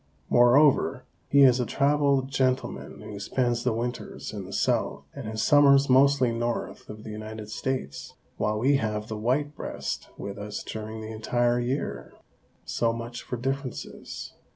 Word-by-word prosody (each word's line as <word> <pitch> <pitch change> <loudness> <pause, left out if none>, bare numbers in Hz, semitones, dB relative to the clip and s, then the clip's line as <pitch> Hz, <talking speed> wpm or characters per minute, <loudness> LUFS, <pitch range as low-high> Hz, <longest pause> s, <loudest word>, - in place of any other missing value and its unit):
Moreover, 130 +1 +5 0.2
he 140 0 +6
is 130 -1 +6
a 125 - +1
traveled 140 -1 +2
gentleman 130 -1 -1
who 105 -1 -8
spends 120 +3 0
the 125 - +2
winters 120 +2 -4
in - - -5
the - - -10
South - - 0
and 135 -6 -7
his 110 0 -2
summers 140 -2 +6
mostly 135 -1 +5
north 120 +1 -3
of 105 0 -9
the 110 - -7
United 110 0 -7
States, 110 - -4 0.2
while 105 0 0
we 135 +5 +3
have 105 -3 -3
the 110 - -3
white 140 +7 0
breast - - -5
with 100 0 -6
us 105 +1 -5
during 110 0 -6
the 110 0 -6
entire 120 +2 +1
year. 125 +4 -3 0.5
So 115 -1 +1
much 115 +1 -6
for 125 - -5
differences. 135 +1 -5
120 Hz, 155 wpm, -27 LUFS, 110-135 Hz, 0.5 s, he